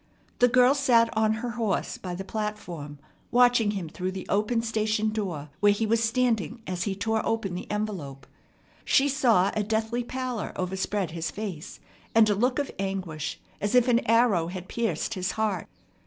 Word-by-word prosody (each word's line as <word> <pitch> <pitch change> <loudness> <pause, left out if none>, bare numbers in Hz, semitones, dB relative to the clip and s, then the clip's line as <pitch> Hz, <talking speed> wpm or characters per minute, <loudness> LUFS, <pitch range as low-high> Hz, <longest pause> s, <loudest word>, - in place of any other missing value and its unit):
The 245 - +6
girl 250 +2 +5
sat 240 -6 +3
on 220 0 +3
her 240 - -2
horse 225 -5 -2
by 180 -2 -5
the 190 - -5
platform, 190 -9 -5 0.3
watching 245 -3 +4
him 195 -5 -3
through 185 +3 -4
the 190 - -6
open 215 +3 +1
station 220 -1 0
door 180 -9 -4
where 205 0 +5
he 220 +2 -1
was 230 +1 +2
standing 230 -1 0
as 180 -1 -3
he 200 -2 -1
tore 220 +2 0
open 225 -5 -1
the 180 - -6
envelope. 180 -11 -4 0.6
She 275 - +4
saw 230 -8 +3
a 215 - +1
deathly 220 +3 -1
pallor 255 -2 -4
overspread 190 0 -2
his 165 0 -3
face, 195 -7 -6 0.4
and 225 -1 +7
a - - +4
look 250 +5 +1
of 285 -2 -1
anguish 190 -6 -3 0.2
as 205 +4 0
if 250 0 +5
an 240 -1 +4
arrow 225 -7 +4
had 180 +1 -6
pierced 225 -3 -1
his 185 -2 -2
heart. 215 -5 -1
215 Hz, 175 wpm, -27 LUFS, 185-230 Hz, 0.6 s, and